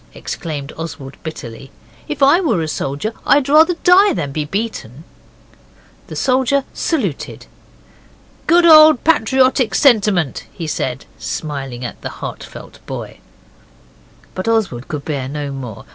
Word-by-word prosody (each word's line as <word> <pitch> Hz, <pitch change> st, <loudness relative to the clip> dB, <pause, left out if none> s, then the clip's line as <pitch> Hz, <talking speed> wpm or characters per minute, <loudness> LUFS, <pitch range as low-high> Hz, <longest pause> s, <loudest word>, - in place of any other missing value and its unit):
exclaimed 150 Hz, -5 st, -6 dB
Oswald 145 Hz, -4 st, -7 dB
bitterly. 135 Hz, -5 st, -8 dB, 0.4 s
'If 295 Hz, -2 st, -2 dB
I 295 Hz, +7 st, +5 dB
were 225 Hz, -, 0 dB
a -, -, -3 dB
soldier 145 Hz, +8 st, -3 dB
I'd 285 Hz, -1 st, +3 dB
rather 315 Hz, +5 st, +5 dB
die 385 Hz, +3 st, +6 dB
than 140 Hz, -, -3 dB
be 150 Hz, +1 st, -3 dB
beaten.' 160 Hz, -, -5 dB, 1.0 s
The -, -, -8 dB
soldier 265 Hz, +1 st, +1 dB
saluted. 320 Hz, -4 st, -3 dB, 1.0 s
'Good 345 Hz, +1 st, +5 dB
old 310 Hz, -4 st, +8 dB
patriotic 260 Hz, -6 st, +2 dB
sentiment' 205 Hz, -, +2 dB
he 170 Hz, -, -7 dB
said, 130 Hz, -4 st, -3 dB
smiling 135 Hz, -5 st, -5 dB
at -, -, -8 dB
the -, -, -5 dB
heart -, -, -6 dB
felt -, -, -12 dB
boy. -, -, -7 dB, 1.1 s
But 185 Hz, -, -5 dB
Oswald 205 Hz, -, 0 dB
could 150 Hz, -2 st, -5 dB
bear 135 Hz, -4 st, -3 dB
no 145 Hz, 0 st, -4 dB
more. 125 Hz, -6 st, -8 dB
185 Hz, 130 wpm, -17 LUFS, -, 1.1 s, old